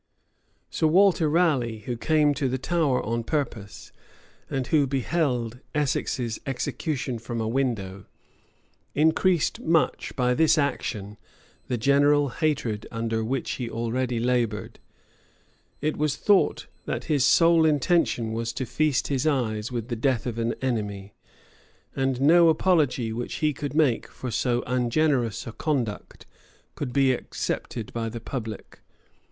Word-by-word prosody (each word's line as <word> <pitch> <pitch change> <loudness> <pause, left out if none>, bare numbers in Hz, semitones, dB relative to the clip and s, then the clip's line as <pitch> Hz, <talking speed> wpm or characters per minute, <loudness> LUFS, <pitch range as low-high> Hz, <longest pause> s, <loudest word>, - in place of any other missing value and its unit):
534 - - -5
Sir 160 -1 +3
Walter 180 -3 +4
Raleigh, 145 -9 +1
who 120 +3 -4
came 150 +3 +2
to 140 -1 -1
the 130 - -1
Tower 145 -2 0
on 115 +1 -1
purpose, 115 -8 -4 0.6
and 135 -1 -2
who 145 +1 +2
beheld 130 -3 -1 0.2
Essex's 130 -5 -1
execution 135 -1 -3
from 115 +1 -5
a 110 - -1
window, 110 -7 -2 0.9
increased 160 +3 +2
much 165 0 0
by 125 -1 +2
this 160 +4 +4
action 105 -8 -2 0.5
the 125 - -1
general 140 +3 +3
hatred 130 -8 -1
under 115 -1 -2
which 130 +3 -2
he 120 -3 -4
already 120 +1 -2
labored: 120 -3 -1 1.0
it 155 +1 0
was 150 -1 0
thought, 205 +3 +2 0.2
that - - -3
his 145 -5 +1
sole 165 +3 +5
intention 150 -6 +2
was 115 +1 -2
to 130 +1 -3
feast 155 0 0
his 140 +1 0
eyes 115 -6 -1
with 120 -1 -4
the 120 - -1
death 120 0 0
of 115 -2 -3
an 115 0 -1
enemy; 105 -5 -3 0.8
and 135 -2 0
no 165 +4 +6
apology 155 -9 +2
which 120 +2 -4
he 155 -2 +1
could 145 0 -5
make 145 -7 +2
for 125 - -7
so 120 +2 0
ungenerous 125 -2 0
a 115 - -6
conduct 125 -6 -3 0.5
could 135 -4 -4
be 135 0 +3
accepted 120 -2 -4
by 115 -1 -2
the 115 +1 -6
public. 115 -3 -7
130 Hz, 140 wpm, -25 LUFS, 115-150 Hz, 1.0 s, no